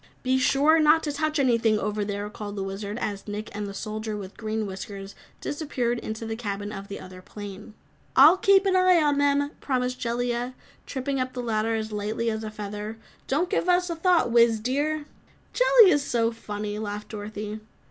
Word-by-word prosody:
"Be 260 Hz, +1 st, +2 dB
sure 290 Hz, +5 st, +4 dB
not 310 Hz, +1 st, +5 dB
to 295 Hz, -, -1 dB
touch 310 Hz, +2 st, -1 dB
anything 230 Hz, -5 st, +3 dB
over 210 Hz, 0 st, -1 dB
there," 205 Hz, 0 st, -3 dB
called 210 Hz, -1 st, -7 dB
the 195 Hz, -, -3 dB
Wizard, 200 Hz, +2 st, -5 dB
as 205 Hz, -4 st, -4 dB
Nick 210 Hz, 0 st, -6 dB
and 205 Hz, 0 st, -3 dB
the 200 Hz, -, -6 dB
Soldier 215 Hz, 0 st, -4 dB
with 195 Hz, -1 st, -8 dB
Green 220 Hz, 0 st, -2 dB
Whiskers 195 Hz, 0 st, -7 dB, 0.3 s
disappeared 250 Hz, -6 st, -2 dB
into 220 Hz, 0 st, -5 dB
the 225 Hz, 0 st, -3 dB
cabin 205 Hz, -2 st, -4 dB
of 200 Hz, -1 st, -7 dB
the 200 Hz, -, -6 dB
other 185 Hz, 0 st, -11 dB
plane. 205 Hz, +2 st, -9 dB, 0.4 s
"I'll 305 Hz, +7 st, +8 dB
keep 390 Hz, +1 st, +5 dB
an 380 Hz, -1 st, +3 dB
eye 370 Hz, -1 st, +5 dB
on 290 Hz, -2 st, +2 dB
them," 285 Hz, 0 st, +2 dB
promised 255 Hz, -2 st, -1 dB
Jellia, 240 Hz, +1 st, -2 dB, 0.3 s
tripping 270 Hz, 0 st, -2 dB
up 255 Hz, 0 st, -2 dB
the 250 Hz, -, -4 dB
ladder 225 Hz, -1 st, 0 dB
as 220 Hz, 0 st, -3 dB
lightly 215 Hz, +2 st, -1 dB
as 220 Hz, 0 st, -4 dB
a 215 Hz, -, -4 dB
feather. 210 Hz, +1 st, -6 dB, 0.3 s
"Don't 305 Hz, +7 st, +1 dB
give 360 Hz, -, +1 dB
us 360 Hz, 0 st, +3 dB
a -, -, -2 dB
thought, 335 Hz, -6 st, +3 dB
Wiz, 230 Hz, -1 st, +5 dB
dear." 290 Hz, +6 st, -1 dB, 0.5 s
"Jellia's 470 Hz, -, +6 dB
so 235 Hz, -4 st, +1 dB
funny!" 210 Hz, -2 st, -5 dB
laughed 210 Hz, -1 st, -5 dB
Dorothy. 210 Hz, 0 st, -6 dB
225 Hz, 190 wpm, -26 LUFS, 210-285 Hz, 0.5 s, I'll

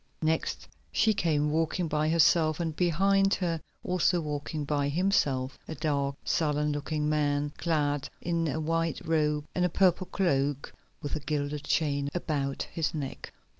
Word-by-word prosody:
Next 160 Hz, +1 st, -1 dB, 0.2 s
she 220 Hz, -1 st, +3 dB
came, 150 Hz, -6 st, +1 dB
walking 165 Hz, +2 st, 0 dB
by 155 Hz, 0 st, +1 dB
herself, 160 Hz, -1 st, +4 dB
and 165 Hz, -2 st, -2 dB
behind 195 Hz, +3 st, +3 dB
her, 165 Hz, -4 st, -2 dB, 0.2 s
also 180 Hz, 0 st, +2 dB
walking 150 Hz, -1 st, -3 dB
by 145 Hz, -1 st, 0 dB
himself, 145 Hz, -6 st, +1 dB
a 160 Hz, -, -5 dB
dark, 140 Hz, -3 st, -1 dB
sullen 150 Hz, -1 st, +1 dB
looking 150 Hz, +1 st, -2 dB
man, 145 Hz, -1 st, +1 dB
clad 145 Hz, -4 st, 0 dB
in 165 Hz, -1 st, -1 dB
a 150 Hz, +2 st, -1 dB
white 165 Hz, +1 st, 0 dB
robe 150 Hz, -2 st, +1 dB
and 180 Hz, -, 0 dB
a 180 Hz, -, +3 dB
purple 185 Hz, +1 st, +2 dB
cloak, 140 Hz, -6 st, 0 dB, 0.3 s
with 145 Hz, -, -2 dB
a -, -, -2 dB
gilded 145 Hz, 0 st, -3 dB
chain 140 Hz, -3 st, +1 dB
about 140 Hz, -5 st, -1 dB
his 160 Hz, -1 st, -1 dB
neck. 140 Hz, -3 st, -5 dB
155 Hz, 150 wpm, -29 LUFS, 145-165 Hz, 0.3 s, herself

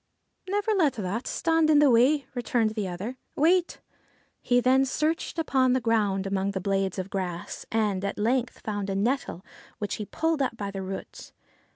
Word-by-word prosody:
' -, -, -18 dB
Never 410 Hz, +2 st, +1 dB
let 325 Hz, -9 st, +3 dB
that 210 Hz, +3 st, -3 dB
stand 325 Hz, -1 st, +2 dB
in 305 Hz, -, +6 dB
the 290 Hz, -2 st, +6 dB
way,' 265 Hz, +4 st, +4 dB
returned 240 Hz, -2 st, 0 dB
the 215 Hz, -3 st, -3 dB
other. 195 Hz, +8 st, -5 dB, 0.2 s
'Wait! 345 Hz, +4 st, +2 dB, 0.3 s
' -, -, -38 dB
He 245 Hz, 0 st, +3 dB
then 260 Hz, +2 st, +4 dB
searched 310 Hz, +6 st, -1 dB
upon 265 Hz, -5 st, +2 dB
the 260 Hz, -, +2 dB
ground 210 Hz, -5 st, +1 dB
among 195 Hz, 0 st, -1 dB
the 190 Hz, -, -2 dB
blades 195 Hz, 0 st, -1 dB
of 190 Hz, +1 st, -4 dB
grass, 180 Hz, -3 st, -4 dB
and 210 Hz, -4 st, 0 dB
at 200 Hz, -, -3 dB
length 240 Hz, +3 st, 0 dB
found 205 Hz, -2 st, -3 dB
a 195 Hz, -, -1 dB
nettle, 215 Hz, -3 st, -1 dB, 0.3 s
which 205 Hz, -2 st, -3 dB
he 210 Hz, -, -4 dB
pulled 320 Hz, +5 st, -1 dB
up 250 Hz, -3 st, -1 dB
by 200 Hz, -2 st, -4 dB
the 195 Hz, -1 st, -5 dB
roots. 190 Hz, +1 st, -7 dB
230 Hz, 190 wpm, -27 LUFS, 195-275 Hz, 0.3 s, in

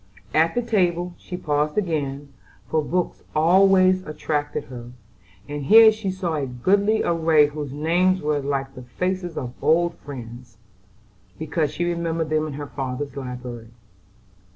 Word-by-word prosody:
At 160 Hz, +1 st, +3 dB
the 245 Hz, -, +1 dB
table 180 Hz, -6 st, 0 dB
she 180 Hz, -, -7 dB
paused 150 Hz, 0 st, -1 dB
again, 145 Hz, -7 st, -2 dB, 0.3 s
for 160 Hz, -, +1 dB
books 180 Hz, +3 st, -2 dB
always 185 Hz, +3 st, +5 dB
attracted 150 Hz, -2 st, -3 dB
her, 120 Hz, -1 st, -10 dB, 0.5 s
and 145 Hz, -1 st, -5 dB
here 220 Hz, +5 st, +8 dB
she 215 Hz, -2 st, -4 dB
saw 185 Hz, -3 st, -2 dB
a 140 Hz, -2 st, -2 dB
goodly 200 Hz, -, +1 dB
array 160 Hz, -3 st, +4 dB
whose 145 Hz, -1 st, -5 dB
names 175 Hz, +6 st, +2 dB
were 150 Hz, -2 st, 0 dB
like 135 Hz, -1 st, -3 dB
the 130 Hz, -, -10 dB
faces 180 Hz, +7 st, -3 dB
of 125 Hz, -2 st, -4 dB
old 170 Hz, +4 st, +3 dB
friends, 120 Hz, -4 st, -10 dB, 0.8 s
because 155 Hz, -1 st, -1 dB
she 175 Hz, +3 st, -2 dB
remembered 165 Hz, -2 st, -2 dB
them 155 Hz, 0 st, +1 dB
in 150 Hz, -, -6 dB
her 145 Hz, +1 st, -5 dB
father's 135 Hz, 0 st, -5 dB
library. 125 Hz, -3 st, -7 dB
155 Hz, 145 wpm, -23 LUFS, 140-180 Hz, 0.8 s, here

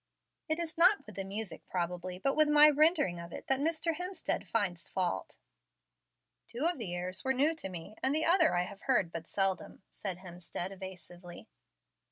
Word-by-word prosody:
"It 315 Hz, -, +1 dB
is 335 Hz, -1 st, -4 dB
not 370 Hz, +4 st, +5 dB
with 210 Hz, -, -12 dB
the 195 Hz, -, -3 dB
music 195 Hz, -2 st, -5 dB
probably, 180 Hz, 0 st, -3 dB
but 275 Hz, +9 st, 0 dB
my 300 Hz, 0 st, +8 dB
rendering 295 Hz, -, +3 dB
of 170 Hz, 0 st, -9 dB
it, -, -, -8 dB
that 270 Hz, 0 st, +2 dB
Mr. 325 Hz, +2 st, 0 dB
Hemstead 360 Hz, -1 st, -3 dB
finds 185 Hz, -7 st, -1 dB
fault." 180 Hz, -, -2 dB, 1.1 s
"Two 245 Hz, +6 st, -2 dB
of 345 Hz, -4 st, +2 dB
the 180 Hz, -6 st, -4 dB
airs 180 Hz, +1 st, -4 dB
were 265 Hz, -, +1 dB
new 290 Hz, +5 st, +3 dB
to 190 Hz, -, -5 dB
me, 175 Hz, +1 st, -8 dB
and 270 Hz, +2 st, +3 dB
the 315 Hz, -, +4 dB
other 335 Hz, -, +5 dB
I 175 Hz, -, +2 dB
have 200 Hz, +2 st, -9 dB
heard 240 Hz, -10 st, +1 dB
but 165 Hz, -1 st, -6 dB
seldom," 195 Hz, 0 st, -2 dB
said 190 Hz, -4 st, -5 dB
Hemstead, 180 Hz, 0 st, -6 dB
evasively. 180 Hz, -2 st, -10 dB
195 Hz, 180 wpm, -32 LUFS, -, 1.1 s, my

